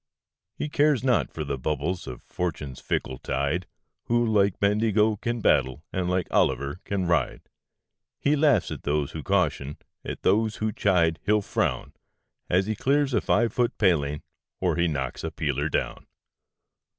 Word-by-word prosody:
He - - -3
cares 145 -3 +2
not 125 -3 +2
for 80 - -4
the 70 -2 -3
bubbles 75 +6 -2
of 60 - -8
Fortune's 75 -7 -4
fickle 65 -1 -3
tide, 70 +7 -1 0.4
Who 120 0 +2
like 100 -4 +2
Bendigo 105 +1 +2
can 120 +2 -3
battle, 65 -4 +2
and 90 -1 -1
like 90 -1 0
Olliver 70 +5 +1
can 100 -2 -1
ride. 85 -7 0 0.7
He 145 +1 +2
laughs 145 - +3
at - - -5
those 75 -1 -1
who - - -6
caution, 70 +2 0 0.3
at - - -6
those 110 +3 +2
who 110 0 -1
chide 85 -6 +2
he'll 105 0 +2
frown, - - -1 0.6
As 95 +2 +3
he 110 - -1
clears 140 +4 +1
a - - +2
five 115 +1 +2
foot 120 -1 0
paling, 75 -7 +1 0.4
or - - +1
he 85 0 +2
knocks 65 -5 -3
a - - -2
peeler 75 0 -1
down. - - -2
90 Hz, 160 wpm, -26 LUFS, 75-110 Hz, 0.7 s, laughs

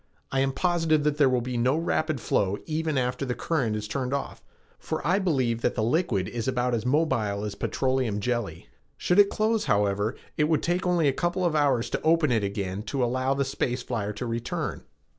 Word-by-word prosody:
I 135 - +1
am 135 0 +2
positive 165 -1 +1
that 150 0 0
there 140 -3 +6
will 125 -1 +1
be 125 0 -3
no 130 +5 +2
rapid 155 -3 0
flow 100 -2 0
even 155 -2 -1
after 125 +1 -1
the 125 -2 -2
current 130 -10 -1
is 105 0 -4
turned 130 +4 -2
off, 140 - -5 0.4
for 160 - -4
I 180 +5 +3
believe 130 - 0
that 120 - 0
the 110 - 0
liquid 115 - +1
is 120 -1 -4
about 125 -1 0
as 120 +1 -1
mobile 115 -9 +1
as 105 -1 -3
petroleum 130 -5 -1
jelley. 105 - -2 0.3
Should 180 +3 +2
it 200 -1 +7
close, 220 0 0
however, 100 +3 +1 0.2
it 150 - +3
would 155 -1 +1
take 175 +1 0
only 175 -4 +3
a 135 - +3
couple 175 +4 -1
of 165 -3 +1
hours 140 -6 +2
to - - -1
open 160 -3 +3
it 110 -3 +2
again 100 -1 -3
to 135 -3 0
allow 130 +2 0
the 140 0 0
space 125 -1 -2
flyer 110 -5 -2
to 115 +4 -5
return." 115 0 -3
130 Hz, 210 wpm, -26 LUFS, 115-155 Hz, 0.4 s, it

